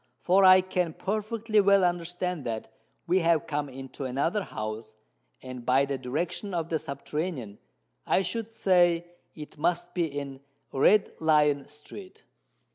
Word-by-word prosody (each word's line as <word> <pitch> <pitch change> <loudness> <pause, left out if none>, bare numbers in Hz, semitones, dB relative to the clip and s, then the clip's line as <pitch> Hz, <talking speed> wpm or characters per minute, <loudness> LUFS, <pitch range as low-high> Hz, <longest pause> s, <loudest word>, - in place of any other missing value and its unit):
—for 190 +2 +3
I 185 0 +8
can 180 -3 -1
perfectly 215 +2 0
well 200 -1 +4
understand 175 -1 -1
that 110 -1 -5 0.3
we 180 +2 +3
have 165 -3 +2
come 145 -2 -3
into 135 +1 -8
another 140 +11 0
house—and, 110 - -9
by 130 +3 +3
the 140 -1 -3
direction 165 +9 -3
of 165 -1 -2
the 160 - 0
subterranean, 140 - -5 0.5
I 190 - +3
should 225 +4 -3
say 175 -5 +3 0.3
it 150 -1 -10
must 175 +2 0
be 175 -2 +1
in 140 -2 -6 0.3
Red 195 +10 +4
Lion 150 -3 +3
Street." 165 +6 -10
165 Hz, 135 wpm, -27 LUFS, 135-185 Hz, 0.5 s, I